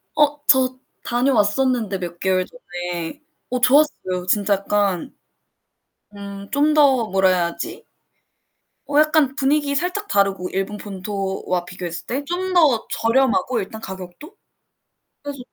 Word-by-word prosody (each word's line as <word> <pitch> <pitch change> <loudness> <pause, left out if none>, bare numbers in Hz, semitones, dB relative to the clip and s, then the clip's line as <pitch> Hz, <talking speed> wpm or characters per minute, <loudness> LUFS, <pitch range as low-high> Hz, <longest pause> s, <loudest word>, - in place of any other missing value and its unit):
어. 295 0 +2
저 260 -2 +4 0.3
다녀왔었는데 240 -3 +1
몇 175 -1 -6
개월 185 -1 +1
전에. 175 - -6 0.3
어, 250 0 -1
좋았어요. 250 -10 +2
진짜 205 +1 +2
약간 200 +1 -1 1.0
음 200 0 -8
좀 295 +2 +3
더 270 -7 +4
뭐라 190 0 +3
해야 180 -2 +2
하지? 170 - -7 1.0
어 290 +1 +2
약간 305 -3 +3
분위기 285 +1 +1
살짝 360 +7 -2
다르고 195 -2 +1
일본 195 +2 -3
본토와 195 -2 -3
비교했을 175 -2 -6
때? 270 +4 -3
좀 370 +3 -2
더 295 -10 +4
저렴하고, 250 0 +2
일단 210 +3 -7
가격도. 190 - -9 0.9
그래서 285 -1 -6
225 Hz, 255 characters per minute, -21 LUFS, 190-285 Hz, 1.0 s, 저